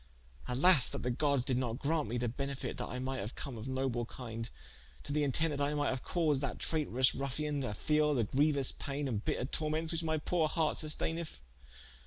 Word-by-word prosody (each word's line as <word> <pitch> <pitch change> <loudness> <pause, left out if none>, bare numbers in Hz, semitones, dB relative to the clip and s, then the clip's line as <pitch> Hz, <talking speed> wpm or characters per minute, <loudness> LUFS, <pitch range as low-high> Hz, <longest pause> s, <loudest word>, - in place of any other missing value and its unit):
Alas, 135 +4 +6
that - - -5
the 125 - +1
Goddes 140 0 +1
did 130 -2 +2
not 120 -2 -1
graunte 150 0 0
me 120 +3 -2
the 120 0 0
benefite, 140 +3 -4
that - - -4
I 125 - -4
might 130 +1 -3
haue 105 +5 -4
come 135 -4 -6
of 110 +2 -6
noble 130 -2 -1
kinde, 115 -2 -6 0.5
to 145 - -4
the 150 - +2
intente 145 +1 +1
I 145 +1 +1
might 145 0 +1
haue 130 - -1
caused 155 -6 +1
that 140 -3 -2
trayterous 130 -5 +2
ruffien, 145 +1 -2
to 120 -5 -3
feele 150 +3 +2
the 120 - +2
grieuous 140 +4 +2
paine 140 0 -3
and 110 -5 -2
bitter - - -1
tormentes, 155 +3 -1
which 165 -1 -1
my 160 -1 0
poore 160 +1 +1
harte 160 -1 +1
susteineth. 160 +1 -2
140 Hz, 205 wpm, -33 LUFS, 125-150 Hz, 0.5 s, Alas